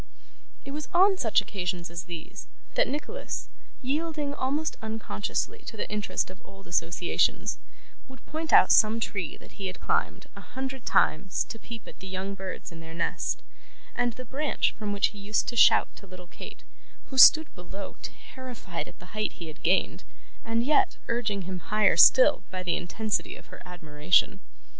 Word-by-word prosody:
It 275 - -6
was 300 +1 -5
on 385 +2 +6
such 220 -3 +3
occasions 180 -3 -4
as 170 -1 -6
these, 170 -3 -8 0.3
that - - +3
Nicholas, 445 - -5 0.3
yielding 295 +1 -2
almost 285 +3 -1
unconsciously 220 - -3
to 225 - -7
the - - -3
interest 200 -3 -2
of 185 - -15
old 195 0 -15
associations, 170 0 0 0.5
would 260 0 -15
point 315 +1 -4
out - - +7
some 220 +1 +5
tree 190 -7 -3
that - - -16
he 195 - -1
had 185 - -7
climbed, - - -1
a - - -10
hundred 265 -1 -6
times, 180 +4 +2
to 225 - -7
peep 230 -1 -10
at - - -12
the 190 - -9
young 190 +1 -4
birds 190 -2 -7
in 165 - -10
their 165 0 -10
nest; 170 - -2 0.5
and 240 -1 0
the 255 - -9
branch 285 +5 0
from 210 -2 -3
which 200 -1 +2
he 210 - -12
used 205 +2 0
to 240 - -5
shout - - +6
to 200 - -13
little 185 -1 -11
Kate, 175 - -11 0.5
who 265 - -5
stood 315 +4 +8
below 190 +2 -8
terrified 245 -9 -7
at - - -13
the 180 - -15
height 215 0 -1
he 170 -2 -8
had 155 - -12
gained, 185 +3 +1 0.4
and 230 +1 0
yet 325 +8 +2
urging 215 -5 -1
him 185 0 -5
higher 210 +4 +2
still - - +7
by 185 -1 -5
the 175 - +1
intensity 215 +4 -2
of - - -15
her - - -10
admiration. 175 +3 +1
210 Hz, 175 wpm, -27 LUFS, 185-260 Hz, 0.5 s, stood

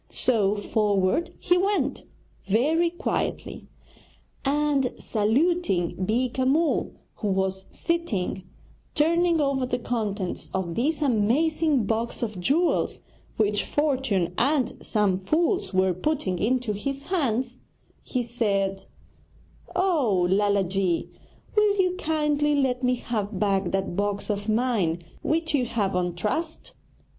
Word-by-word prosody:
So 210 -5 +1
forward 205 - +1
he 355 +1 +2
went, 400 +2 0 0.4
very 310 - +3
quietly, 345 - -3 0.8
and 285 -2 +1
saluting 225 - +1
Beeka 250 +5 0
Mull, 300 +5 +1 0.2
who 210 - -3
was 190 -1 -1
sitting 295 - -2 0.5
turning 335 +2 +3
over 275 -3 +1
the 245 - -1
contents 215 -6 -3
of 180 -3 -2
this 295 - 0
amazing 280 +4 +2
box 230 +3 -2
of 215 -5 -3
jewels 310 - +1 0.4
which 210 -1 +2
fortune 260 - 0
and 270 +1 +1
some 200 -4 +1
fools 335 - 0
were 185 -1 +2
putting 185 - -1
into 240 +1 0
his 275 +7 -4
care, 275 - 0 0.6
he 250 -2 -2
said: 200 -5 -1 0.9
'Oh, 270 - +2
Lala 200 0 +3
ji, 185 -2 -1 0.4
will 420 -1 +3
you 365 -1 +2
kindly 300 -3 +1
let 260 -3 +1
me 250 0 +2
have 215 -5 -3
back 195 -2 +1
that 195 -2 -2
box 205 +1 -1
of 205 +1 -3
mine 215 -8 +1 0.2
which 325 0 0
you 265 -4 +2
have 205 -5 -1
on 180 -1 0
trust?' 315 - -3
240 Hz, 120 wpm, -25 LUFS, 200-300 Hz, 0.9 s, very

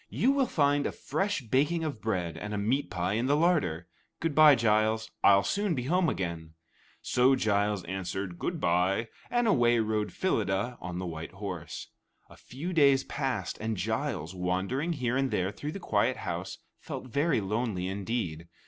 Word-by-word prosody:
You 260 - +2
will 275 -2 +2
find 145 -4 +2
a - - -3
fresh 195 +4 -2
baking 145 +8 +1
of 145 -8 -4
bread 90 -7 -2
and 105 +5 -5
a - - -2
meat 120 +8 0
pie 90 +2 -1
in 115 +4 0
the 145 - +3
larder. 95 - +1 0.3
Good 165 -2 -1
bye, 150 -1 +8
Giles; 110 -1 +1
I'll 100 0 +6
soon 200 - 0
be 125 - -2
home 175 +5 +2
again." 80 -3 -4 0.5
So 130 +2 +4
Giles 105 -3 +1
answered, 95 0 -4
"Good 175 -2 -2
bye," 95 +5 +1 0.2
and 240 0 +1
away 120 - +4
rode 110 -1 0
Phyllida 115 - -1
on 90 -1 -5
the 90 - -3
white 80 -1 -6
horse. 95 -4 -6 0.4
A - - -13
few 155 +9 -6
days 140 -4 +5
passed, 135 -4 -3
and 110 -1 -2
Giles, 80 -1 -2
wandering 95 - -1
here 125 -5 -1
and 135 0 +1
there 95 -4 0
through 150 +8 -6
the 195 - -6
quiet - - +1
house, - - -4 0.2
felt - - -6
very 140 +3 +1
lonely 105 -2 -2
indeed. 95 -4 -3
110 Hz, 175 wpm, -29 LUFS, 95-145 Hz, 0.5 s, bye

